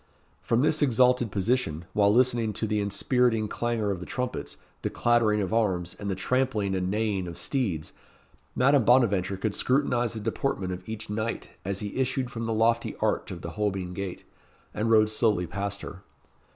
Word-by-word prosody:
From 115 +3 +1
this 155 0 +2
exalted 125 -3 +3
position, 95 -6 0
while 100 -1 +4
listening 120 -2 +2
to 110 - -2
the 105 -1 0
inspiriting 110 +2 +1
clangour 115 -2 -1
of 95 - -3
the 90 - -8
trumpets, 125 -1 -4 0.2
the - - -1
clattering 115 -3 +2
of 95 - -3
arms, 95 -6 0
and 100 - -4
the 95 - -1
trampling 110 -1 0
and 90 -1 -1
neighing 105 -3 -1
of 85 - -7
steeds, 95 - -2 0.6
Madame 135 0 +4
Bonaventure 100 -6 +3
could 100 +2 -2
scrutinize 125 -3 +1
the - - -3
deportment 105 -3 -2
of 90 +3 -9
each 110 -1 -5
knight 110 +2 -3
as 100 +2 -3
he 105 +2 -5
issued 130 -1 0
from 115 0 -4
the 115 - -2
lofty 115 +1 +1
arch - - 0
of 85 -2 -7
the 85 - -5
Holbein 95 -3 -2
Gate, 95 -1 -5 0.5
and 110 +2 -1
rode 110 -1 +5
slowly 110 -5 +2
past 100 +3 -4
her. - - -8
110 Hz, 180 wpm, -27 LUFS, 100-120 Hz, 0.6 s, rode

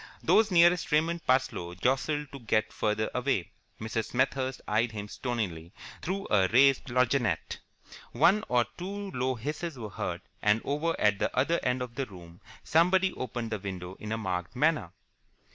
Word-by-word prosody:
Those 220 0 +4
nearest 175 -1 +4
Raymond 165 +3 +1
Parsloe 90 -9 +1
jostled 135 - 0
to 140 - -8
get 110 -2 0
further 105 +1 -1
away. 125 - -1 0.3
Mrs. 110 0 -2
Smethurst 130 +1 -1
eyed 110 +2 +1
him 105 -1 -5
stonily 100 -9 -4 0.3
through 195 +3 -3
a 95 -3 +4
raised 135 +6 +4
lorgnette. 125 -2 0 0.5
One 210 +4 +4
or 120 -1 +3
two 200 +2 -5
low 130 -1 -1
hisses 150 +5 -4
were 110 -4 -6
heard, - - -4 0.2
and 105 +1 +3
over 155 +4 -1
at 105 -1 +3
the - - +1
other 165 +6 +2
end 125 0 0
of 120 -2 -8
the 135 +1 -3
room 85 -3 -13 0.2
somebody 185 +3 +3
opened 120 -2 -4
the 110 - -2
window 95 -2 -6
in 105 - -6
a 110 - 0
marked 90 -2 -3
manner. 150 - +1
125 Hz, 160 wpm, -29 LUFS, 105-150 Hz, 0.5 s, Those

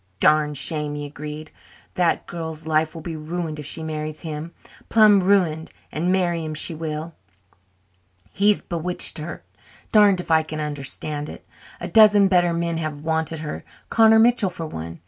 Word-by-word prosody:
"Darned 150 +1 +3
shame," 150 +1 -2
he 145 0 -5
agreed. 150 +2 -8 0.4
"That 175 -2 +1
girl's 160 -2 -6
life 155 0 0
will 165 - -8
be 165 -2 -5
ruined 155 0 -4
if 150 - -5
she 160 - -2
marries 155 -1 -5
him, 160 0 -6 0.4
plum' 215 -3 +6
ruined, 180 -5 +2 0.2
and 170 +4 -1
marry 175 -3 +1
him 155 -1 -5
she 165 - 0
will. 160 +1 -5 1.2
He's 205 +1 +2
bewitched 175 0 -3
her 155 +3 -7 0.5
darned 205 -3 +5
if 180 - -5
I 160 0 +5
can 155 0 -6
understand 150 0 -4
it. - - -11 0.3
A - - -5
dozen 210 -3 +6
better 175 -2 +3
men 170 0 -1
have 155 -3 -4
wanted 160 0 -2
her 150 -1 -6 0.3
Connor 225 -1 +6
Mitchell 230 -3 +4
for 165 -2 -6
one. 85 - -7
160 Hz, 165 wpm, -22 LUFS, 155-180 Hz, 1.2 s, plum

